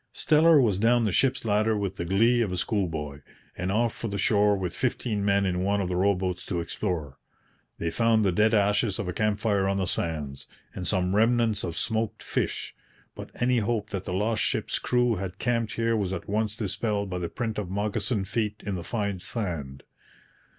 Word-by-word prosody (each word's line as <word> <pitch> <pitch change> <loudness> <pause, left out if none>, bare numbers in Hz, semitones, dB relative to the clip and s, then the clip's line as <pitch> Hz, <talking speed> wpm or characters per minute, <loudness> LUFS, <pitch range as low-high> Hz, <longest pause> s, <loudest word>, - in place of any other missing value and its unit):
Steller 160 0 +5
was 105 -7 +2
down 115 +2 +3
the 105 - +1
ship's 130 +4 +1
ladder 110 +1 +2
with 100 -2 -3
the 85 - -3
glee 115 +7 +3
of 105 -5 0
a 90 - -2
schoolboy, 80 -8 -2 0.3
and 90 +2 -2
off 115 +2 +1
for 115 - -5
the 100 -1 -3
shore 105 +1 +3
with 90 -2 -3
fifteen 115 -4 -1
men 100 0 +2
in 90 -1 0
one 100 +2 +1
of 95 -2 -1
the 90 - -1
row 100 +2 +3
boats 90 -1 -3
to 90 -4 -1
explore. 85 -5 -3 0.6
They 85 - -2
found 115 +1 +3
the 95 - +3
dead 105 +5 +3
ashes 105 -1 +2
of 95 - -3
a 90 - -2
camp 105 +1 +1
fire 100 -4 +1
on 100 0 +1
the 95 - 0
sands, 75 -6 -3 0.3
and 90 - -5
some 95 -1 +1
remnants 115 -1 +2
of 85 - -4
smoked 110 -1 -2
fish; - - -2 0.4
but - - -9
any 125 0 +2
hope 110 -1 -1
that 95 -2 -4
the - - -4
lost 110 +3 0
ship's - - -1
crew 125 -2 +1
had 95 0 -5
camped 115 -1 0
here 115 0 +1
was 100 -4 -1
at 85 - -5
once 105 +1 0
dispelled 105 -1 -1
by 90 - -2
the 85 -1 -3
print 110 -3 -3
of 100 -4 -4
moccasined 105 +1 -1
feet 105 0 -1
in 100 - -2
the 90 -2 -4
fine 100 -2 -2
sand. 80 - -4
100 Hz, 205 wpm, -27 LUFS, 90-115 Hz, 0.6 s, Steller